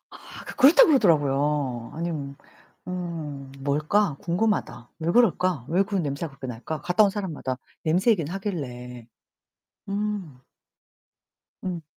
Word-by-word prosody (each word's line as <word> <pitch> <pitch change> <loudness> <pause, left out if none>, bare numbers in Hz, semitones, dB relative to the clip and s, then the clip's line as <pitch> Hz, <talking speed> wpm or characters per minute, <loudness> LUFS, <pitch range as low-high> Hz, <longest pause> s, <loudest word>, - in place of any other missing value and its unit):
아 - - -12
그렇다 310 - +8
그러더라고요. 145 - +2
아니 170 +2 -2
뭐 140 -2 -5 0.5
음 160 -7 -5
뭘까? 155 +5 +1
궁금하다. 180 - -1
왜 165 +2 0
그럴까? 185 - +3
왜 180 +4 +3
그 200 - -5
냄새가 155 -2 -2
그렇게 135 -1 -10
날까? 125 +6 -5
갔다 180 +4 +4
온 200 - +4
사람마다 175 -10 -4 0.3
냄새 180 +8 +3
얘기는 170 -7 0
하길래. 125 - -5 0.8
음. 200 -9 -3 1.2
음. 175 -3 -4
165 Hz, 255 characters per minute, -25 LUFS, 140-195 Hz, 1.2 s, 그렇다